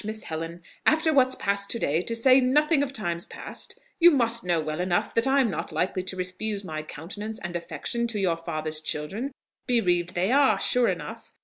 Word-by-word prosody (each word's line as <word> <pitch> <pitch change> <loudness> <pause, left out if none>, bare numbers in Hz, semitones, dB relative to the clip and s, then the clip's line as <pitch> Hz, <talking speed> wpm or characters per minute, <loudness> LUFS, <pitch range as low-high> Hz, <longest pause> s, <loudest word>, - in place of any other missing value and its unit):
Miss 215 +1 -3
Helen. 165 +2 -6 0.2
After 315 +1 +3
what's 260 -2 +4
passed 200 0 0
to - - 0
day, 160 -6 +1
to 230 +5 -3
say 255 +3 +6
nothing 295 +4 +3
of 285 -2 -1
times 175 -9 -4
past, - - -7 0.2
you 345 0 +9
must 235 -6 +2
know 175 -2 +1
well 155 0 -3
enough 180 -1 0
that 230 +3 +2
I'm 265 -4 +3
not - - -4
likely 185 0 -1
to 185 +1 -4
refuse 195 +3 -3
my 155 -3 -4
countenance 200 +8 -7
and 175 -3 -6
affection 175 +8 -3
to 225 -3 -4
your 180 -4 +1
father's 155 -2 -2
children; 175 - -4 0.4
bereaved 180 -8 +2
they 185 +5 +1
are, 280 0 +4
sure 250 -1 +3
enough! - - -6
200 Hz, 195 wpm, -26 LUFS, 170-245 Hz, 0.4 s, you